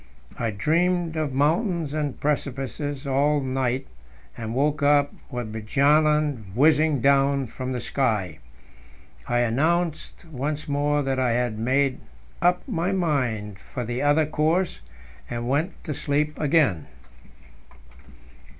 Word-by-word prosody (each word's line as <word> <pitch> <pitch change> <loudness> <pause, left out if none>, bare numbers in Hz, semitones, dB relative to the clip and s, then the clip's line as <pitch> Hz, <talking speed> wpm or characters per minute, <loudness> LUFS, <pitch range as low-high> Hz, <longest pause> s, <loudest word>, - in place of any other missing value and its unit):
I 115 - 0
dreamed 165 - +1
of 155 -3 -1
mountains 160 - +1
and 150 -3 -2
precipices 140 0 -2
all 140 +2 +2
night, 130 -1 -1 0.5
and 115 0 -5
woke 145 +2 +1
up 145 0 +3 0.2
with 120 -5 -5
Bjaaland 140 -1 +2
whizzing 150 0 +4
down 140 0 +3
from 130 +2 -6
the 125 - -2
sky. 110 - -1 0.9
I 120 0 +2
announced 160 +9 0
once 150 +3 -3
more 145 0 +1
that 135 -1 -1
I 125 -2 +2
had 120 -2 -1
made 130 +3 +1 0.4
up 180 +5 +2
my 180 -5 -1
mind 125 - -1
for 125 - -6
the 120 +2 -3
other 145 +2 +3
course, 160 +4 0 0.5
and 120 0 -4
went 150 +8 0
to 155 - -3
sleep 150 +2 -1
again. 140 - +2
140 Hz, 125 wpm, -24 LUFS, 125-155 Hz, 0.9 s, whizzing